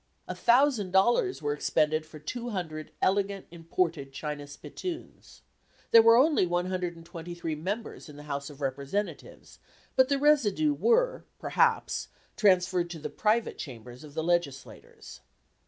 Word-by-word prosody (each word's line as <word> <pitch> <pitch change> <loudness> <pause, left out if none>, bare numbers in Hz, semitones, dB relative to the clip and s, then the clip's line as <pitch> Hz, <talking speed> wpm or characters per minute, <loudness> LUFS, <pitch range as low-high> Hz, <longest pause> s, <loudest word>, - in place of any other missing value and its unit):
A - - -3
thousand 240 -4 +3
dollars 240 - +2
were 145 0 0
expended 155 +1 0
for 155 - -11
two 240 - -5
hundred 160 -7 -5
elegant 195 0 +1
imported 165 -4 -2
china 145 +1 -5
spittoons. 330 - -8 0.5
There 230 - +9
were 230 +1 +7
only 275 - +4
one 175 +1 -1
hundred 180 -2 -2
and 165 0 -13
twenty 170 0 -8
three 165 -2 -3
members 190 +4 -5
in 150 - -11
the 145 - -11
House 140 -1 -4
of 145 -1 -13
Representatives, 140 +9 -4 0.4
but 260 0 +4
the 280 - +2
residue 295 0 +3
were, 480 - +2
perhaps, 465 -2 +1 0.3
transferred 180 -3 +3
to 170 - -6
the 150 0 -6
private 215 +7 0
chambers 125 -1 -9
of 150 -1 -13
the 160 - -1
legislators. 165 -6 -3
175 Hz, 150 wpm, -28 LUFS, 150-230 Hz, 0.5 s, There